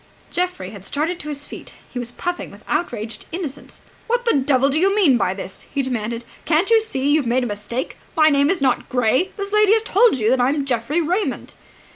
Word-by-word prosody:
Geoffrey 355 - -2
had 200 -3 -10
started 320 - -1
to 300 - -6
his 290 -1 -3
feet. - - -9 0.2
He 245 - -4
was 240 -1 -3
puffing 355 +6 -4
with - - -15
outraged 230 -9 -3
innocence. 320 -6 -6 0.3
"What 485 0 0
the 465 - +3
devil 270 -1 +3
do 290 +3 +1
you 390 +3 +3
mean 350 -11 +5
by 195 -4 0
this?" 190 -1 -8
he 280 -1 0
demanded. 235 -2 -3 0.2
"Can't 335 +7 +2
you 450 -1 +6
see 285 -10 0
you've 295 -4 +2
made 250 +2 +2
a - - -1
mistake? 215 +4 -4 0.2
My 310 0 +6
name 280 +1 +3
is 375 -5 +1
not 260 -2 +1
Gray. 255 - +2
This 400 0 -4
lady 425 -1 +5
has 445 0 +2
told 440 - +4
you 220 -1 +2
that 260 -1 +3
I 245 - +3
am 285 -1 -1
Geoffrey 265 +6 0
Raymond!" 360 +6 -2
280 Hz, 220 wpm, -21 LUFS, 245-360 Hz, 0.3 s, you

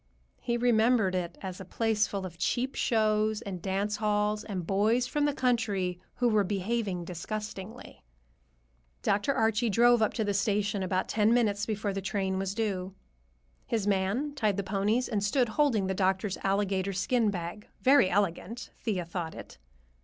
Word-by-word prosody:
He 235 0 -1
remembered 230 -4 +3
it 180 -2 -3
as 190 -1 -6
a - - -5
place 215 +2 0
full 195 -2 -4
of 170 -2 -9
cheap 255 +8 0
shows 215 -1 +1
and 185 -3 -6
dance 200 +3 -1
halls 210 0 0
and 185 -5 -4
boys 215 +6 +2
from 290 +3 0
the 295 - +2
country 210 -9 0 0.2
who 245 - +1
were 215 -3 +3
behaving 195 -1 -2
disgustingly. 205 +3 -7 1.0
Dr. 205 +6 +1
Archie 225 -2 +1
drove 235 +2 +5
up 215 - +1
to 225 - 0
the 205 -1 0
station 205 0 0
about 185 0 -1
ten 220 +2 +3
minutes 210 -4 +1
before 210 -2 -2
the 195 - -3
train 190 -1 -1
was 195 0 -3
due. 195 -4 -2 0.7
His 220 -4 -1
man 205 +9 0
tied 215 -8 0
the 200 - -1
ponies 205 +5 0
and 210 -3 -1
stood 240 +3 +2
holding 230 -5 +2
the 190 - -1
doctor's 190 +1 0
alligator 195 -1 0
skin 220 +4 +1
bag—very 205 +6 +1
elegant, 200 +4 -1
Thea 195 -7 -2
thought 170 -1 -5
it. - - -11
205 Hz, 160 wpm, -29 LUFS, 190-225 Hz, 1.0 s, drove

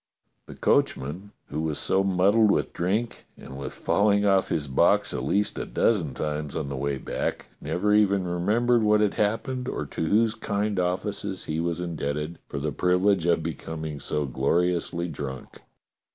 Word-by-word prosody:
The - - -10
coachman, 75 +10 0 0.2
who - - -3
was 80 -2 -2
so 95 +1 +1
muddled 100 +4 +4
with - - +1
drink 105 +7 -2
and 65 - -10
wath 70 - -6
falling 100 0 +2
off 95 -1 +3
his 75 -3 -1
box 100 +9 +3
at - - -2
least 105 +1 0
a - - -3
dozen 85 - +1
times 75 -1 -3
on 75 -3 -3
the 70 - -4
way 70 +1 -1
back, - - -3 0.2
never 105 +4 0
even 100 -3 +3
remembered 110 +8 +2
what 105 0 +4
had 105 -2 +2
happened 125 +5 -1
or - - -3
to - - -4
whose 110 +4 +3
kind 105 -2 -2
offices 95 +2 -2
he 80 0 -2
was 85 0 -1
indebted 75 -2 -3
for - - -6
the 75 +2 -2
privilege 90 +3 +2
of 85 -2 +2
becoming 80 -2 -5
so 75 +1 -1
gloriously 85 +6 0
drunk. 70 -5 -7
90 Hz, 165 wpm, -26 LUFS, 75-105 Hz, 0.2 s, muddled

